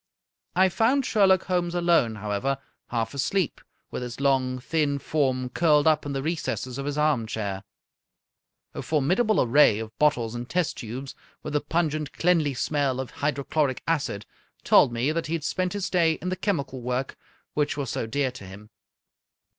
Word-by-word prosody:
I 190 +1 +5
found 245 +8 +2
Sherlock 190 -3 +4
Holmes 175 -1 -1
alone, 170 -10 +3
however, 105 +6 -2 0.3
half 115 0 -2
asleep, 165 +4 -1 0.3
with - - -4
his 125 0 -6
long, 130 -2 +1
thin 145 +2 0
form 130 -4 0
curled 150 +1 +3
up 155 -2 +3
in 140 - -3
the 135 -1 -2
recesses 140 -5 -3
of 140 - -4
his 145 0 -3
armchair. 110 -9 0 1.1
A - - -5
formidable 180 - +2
array 125 -3 +5
of 110 0 -7
bottles 120 -7 +2
and 120 +1 -6
test 180 -3 0
tubes, 130 +4 -6 0.3
with 150 - -5
the 150 - +1
pungent, 155 -3 -1
cleanly 165 -6 +2
smell 140 -1 0
of 130 - -5
hydrochloric 145 -1 -1
acid, 145 -11 -1 0.4
told - - +5
me 120 +5 0
that 165 +1 -2
he 160 - -3
had 165 -3 -2
spent 185 +3 -1
his 200 -2 -2
day 170 -3 +3
in 180 +3 -5
the 185 - -1
chemical 145 -9 -2
work 125 +2 -2 0.4
which 150 -1 0
was 135 -4 -3
so 115 - -2
dear 135 +3 0
to 125 -4 -11
him. 105 +3 -12
145 Hz, 170 wpm, -26 LUFS, 125-165 Hz, 1.1 s, I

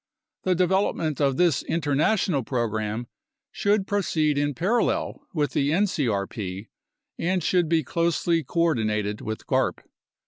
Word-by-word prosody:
The 185 -1 +3
development 180 -5 +1
of 135 -2 +2
this 175 -6 +3
international 160 +2 +1
program 110 -2 -2 0.5
should 205 -1 +1
proceed 160 -7 +1
in 145 -1 0
parallel 230 +9 0
with 150 -6 0
the 140 0 +1
ncrp 110 - -1 0.5
and 180 0 0
should 175 -2 +2
be 160 -1 +2
closely 170 +2 +1
coordinated 110 -10 0
with 110 0 -5
garp. - - 0
155 Hz, 115 wpm, -25 LUFS, 120-180 Hz, 0.5 s, The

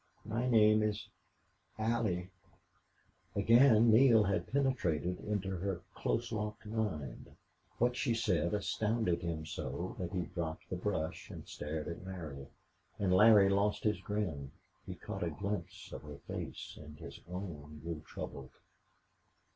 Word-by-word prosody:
"My 120 +4 -1
name 110 -2 +6
is 105 -1 -1 0.7
Allie." 110 -5 0 1.0
Again 115 +2 +6
Neale 115 -1 +7
had 100 +1 -1
penetrated 90 - +1
into 105 -2 -2
her 95 0 -2
close 120 0 -1
locked 105 0 -3
mind. 105 - -3 0.4
What 125 +1 +2
she 120 -3 +1
said 90 -6 +1
astounded 105 -2 0
him 80 -2 -3
so 90 +3 -4
that 90 -2 -3
he 90 -2 -1
dropped 80 -2 -5
the - - 0
brush 90 -4 -2
and - - -9
stared 75 +1 -4
at 85 +1 -5
Larry. 80 -8 -6 0.5
And 95 -2 +2
Larry 105 0 +8
lost 100 +1 +2
his 105 -3 +1
grin; 90 -10 -2 0.4
he - - -5
caught - - -6
a - - +1
glimpse 100 -4 -4
of - - -6
her 75 -1 -9
face, - - -6
and 75 0 -11
his - - -9
own 75 -5 -6
grew 85 -2 -4
troubled. 70 -3 -7
100 Hz, 140 wpm, -34 LUFS, 85-110 Hz, 1.0 s, Larry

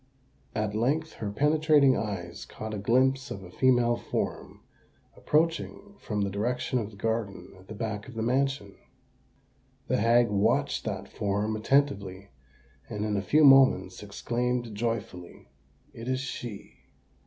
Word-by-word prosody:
At 105 -1 -1
length 145 +9 0
her 105 - -5
penetrating 150 +3 +4
eyes 85 -5 -4
caught 110 0 -7
a 105 - -3
glimpse 130 +5 +2
of 95 - -7
a 90 - -11
female 120 0 +3
form - - -4 0.5
approaching 165 +6 -1
from 105 -2 -3
the 100 -1 -1
direction 125 +5 -1
of 105 -3 -4
the 105 - -15
garden 100 -3 -3
at 95 - -18
the 110 - -8
back 105 -1 -4
of 125 - -11
the 110 - -2
mansion. 130 -4 0 1.1
The - - +2
hag 115 +2 +4
watched 100 0 +1
that - - -4
form 105 +2 -2
attentively, 100 -6 0 0.6
and 105 -2 -3
in 105 -1 -1
a 100 - 0
few 155 +10 +3
moments 135 -10 +5
exclaimed 120 +3 -2
joyfully, 105 - -5 0.4
"It 115 +1 -9
is 130 0 0
she!" 120 -5 -7
115 Hz, 145 wpm, -28 LUFS, 100-130 Hz, 1.1 s, moments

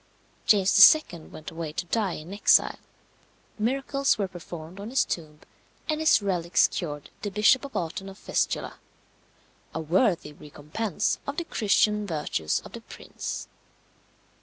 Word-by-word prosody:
James 200 +3 +8 0.2
II. 165 -2 -10
went 155 - -10
away 165 -2 -5
to 175 - -3
die 200 0 -1
in 160 +5 -8
exile, 205 - +3 0.8
miracles 275 +4 +1
were 200 -2 -1
performed 175 0 -10
on 205 +2 -6
his 265 - +2
tomb, 155 -3 -6 0.5
and 310 -1 -1
his 315 -9 +4
relics 175 -3 +2
cured 150 -4 -6
the 205 - -3
Bishop 210 +6 +4
of 280 - -8
Autun 180 +3 -4
of 195 - -12
fistula - - -2 1.0
a - - -1
worthy 170 -1 +1
recompense 155 +9 -3
of 280 +2 -4
the 340 - -1
Christian 210 -3 +1
virtues 150 - -2
of - - -11
the - - -9
prince. - - -7
190 Hz, 140 wpm, -26 LUFS, 160-215 Hz, 1.0 s, James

